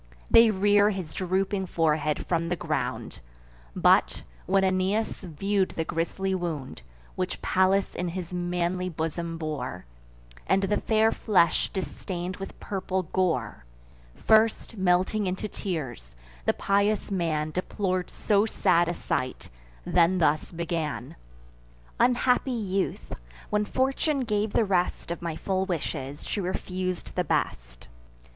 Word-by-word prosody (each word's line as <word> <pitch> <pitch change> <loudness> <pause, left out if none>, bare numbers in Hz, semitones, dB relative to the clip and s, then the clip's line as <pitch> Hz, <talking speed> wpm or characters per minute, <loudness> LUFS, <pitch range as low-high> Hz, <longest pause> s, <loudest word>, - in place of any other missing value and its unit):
They 230 0 +8
rear 205 0 +4
his 190 -6 -4
drooping 190 +1 -1
forehead 155 -3 +1
from 170 -1 0
the 175 - +1
ground; 160 - -3 0.6
But, - - +3 0.2
when 195 +1 +3
Aeneas 190 +3 0
view'd 190 +3 -1
the 165 - +1
grisly 170 +4 -2
wound 160 - -4 0.3
Which - - -3
Pallas 190 +1 +2
in 180 - -3
his 175 0 -5
manly 180 +1 -1
bosom 165 +1 -3
bore, 145 - -4 0.6
And 195 - +3
the 210 +2 +1
fair 220 0 +3
flesh 175 -6 +2
distain'd 185 0 -4
with 195 - -8
purple 190 -1 -2
gore; 160 - 0 0.5
First, 220 +1 +3
melting 190 +2 +2
into 185 +3 -2
tears, 140 - -5 0.3
the - - +3
pious 200 +1 +1
man 155 -5 0
Deplor'd 185 0 -2
so 210 0 +2
sad 175 -5 +3
a 175 - -1
sight, 130 0 -3 0.4
then 175 +2 +3
thus 155 -3 +1
began: 165 -3 -3 0.8
"Unhappy 250 +1 +3
youth! 200 -6 -2 0.4
when 210 0 +2
Fortune 270 +4 0
gave 215 -3 0
the 225 - +3
rest 180 -3 0
Of 170 - -4
my 170 -2 -3
full 190 +1 -1
wishes, 145 -5 -4
she 205 - -2
refus'd 185 0 -3
the - - +1
best! - - -2
185 Hz, 125 wpm, -27 LUFS, 165-200 Hz, 0.8 s, They